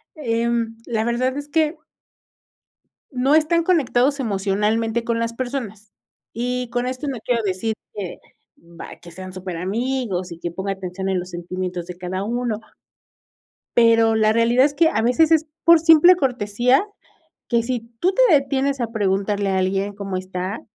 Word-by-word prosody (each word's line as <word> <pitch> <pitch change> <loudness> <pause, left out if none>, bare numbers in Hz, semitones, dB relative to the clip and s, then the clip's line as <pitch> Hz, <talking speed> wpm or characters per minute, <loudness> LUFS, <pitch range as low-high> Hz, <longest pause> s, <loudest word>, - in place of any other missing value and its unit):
em, 230 -4 -1
la 225 -2 -1
verdad 255 +3 0
es 290 0 -5
que 315 0 +1 1.3
no 260 +2 +1
están 320 +2 +3
conectados 280 -5 +2
emocionalmente 215 +1 0
con 230 0 -1
las 230 0 -2
personas, 230 -5 -5 0.4
y 250 +1 -3
con 245 +1 -2
esto 255 +3 -4
no 270 -3 -3
quiero 240 -2 +1
decir 205 +3 -1 0.2
que, 195 -4 -6 0.4
bah, 170 0 -12
que 170 - -12
sean 185 +2 -9
súper 185 -2 -6
amigos, 200 -1 -2
y 170 - -7
que 170 - -4
ponga 195 +3 -3
atención 190 0 -5
en 190 -1 0
los 180 +1 -7
sentimientos 180 0 -5
de 180 0 -8
cada 185 +2 -4
uno. 235 -1 -2 1.2
Pero 230 -1 +5
la 215 0 +3
realidad 235 +3 +4
es 290 - 0
que, 320 +2 +4
a 220 - 0
veces 250 +8 +3
es 315 -1 +4 0.2
por 335 -1 +7
simple 325 +2 +7
cortesía, 250 - +1 0.6
que 235 -2 +2
si 245 0 -2 0.2
tú 370 +2 +2
te - - +4
detienes 275 -1 +1
a 235 - -1
preguntarle 200 -1 0
a 190 - +1
alguien 195 +2 -1
cómo 195 -2 -5
está 185 +2 -4
230 Hz, 160 wpm, -21 LUFS, 195-260 Hz, 1.3 s, por